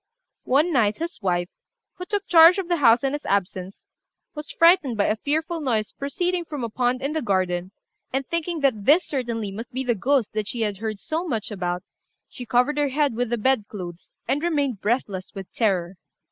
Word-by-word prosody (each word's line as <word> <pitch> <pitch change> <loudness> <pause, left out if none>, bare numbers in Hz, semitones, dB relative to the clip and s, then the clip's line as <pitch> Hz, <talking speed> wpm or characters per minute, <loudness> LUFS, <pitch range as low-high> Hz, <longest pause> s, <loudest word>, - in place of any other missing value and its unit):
One 300 +7 +2
night, 215 -5 +2
his 335 -4 -5
wife, 175 -2 0 0.4
who 360 - -8
took 405 +1 -2
charge 335 +1 +7
of 385 -3 -3
the 345 -1 +1
house 235 -4 +5
in 270 0 0
his 295 - -4
absence, 190 -1 -2 0.5
was 300 0 -7
frightened 330 - +4
by 200 - +2
a 215 - +1
fearful 315 +7 -2
noise 225 -7 0
proceeding 350 +5 -2
from 295 -6 -6
a 230 - -2
pond 245 +3 0
in 280 +2 -1
the 315 - -1
garden, 185 -5 0 0.4
and, 270 +1 -1
thinking 335 0 -3
that 235 -8 +1
this 310 +4 +5
certainly 235 -7 -3
must 230 +6 -7
be 260 +1 -3
the 245 -2 +1
ghost 255 +2 +1
that 215 -1 -2
she 235 - -4
had 205 -3 -1
heard 220 -1 -3
so 320 - -3
much 225 -7 -3
about, 180 -2 -3 0.4
she 245 - -9
covered 250 +6 +2
her 290 -1 +2
head 285 -1 +1
with 245 +1 -1
the 240 - 0
bed 245 -1 +2
clothes 180 -4 -9
and 285 - 0
remained 285 - 0
breathless 205 -4 -2
with 195 -2 -8
terror. 190 -5 0
245 Hz, 200 wpm, -24 LUFS, 205-300 Hz, 0.5 s, charge